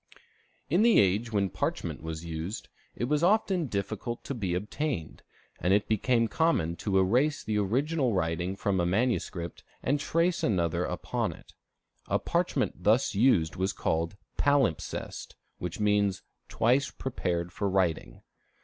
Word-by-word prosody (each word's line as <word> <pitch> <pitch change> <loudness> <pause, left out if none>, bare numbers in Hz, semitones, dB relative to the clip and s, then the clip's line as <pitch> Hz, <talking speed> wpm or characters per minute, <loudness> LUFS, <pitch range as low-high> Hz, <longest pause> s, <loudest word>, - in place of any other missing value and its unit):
In 175 +7 +3
the 235 0 +6
age 105 +5 +2
when 100 -3 +1
parchment - - -3
was 80 +1 -6
used, 85 +6 -5 0.3
it - - -4
was 145 +4 +1
often 185 -3 +2
difficult 110 +3 -3
to - - -4
be 95 -8 -2
obtained; 105 - -3 0.4
and 90 +3 +3
it 105 - +1
became 115 +2 +2
common 110 - +1
to 100 -2 0
erase 125 +11 +2
the 105 -1 0
original 130 +6 +1
writing 90 0 -1
from 100 -1 0
a 85 - +2
manuscript 95 -4 -1 0.2
and 145 +3 +1
trace 165 +4 +1
another 85 -3 +1
upon - - -2
it. - - -17 0.5
A - - +2
parchment - - -1
thus 110 +3 +3
used 100 - +3
was 95 +2 0
called 80 +4 -1 0.2
palimpsest, 140 - 0 0.2
which 90 +1 -5
means 105 -2 +2 0.3
"twice 125 +5 +2
prepared 90 -9 -3
for 100 - -1
writing." 95 -4 -1
105 Hz, 140 wpm, -29 LUFS, 90-130 Hz, 0.5 s, the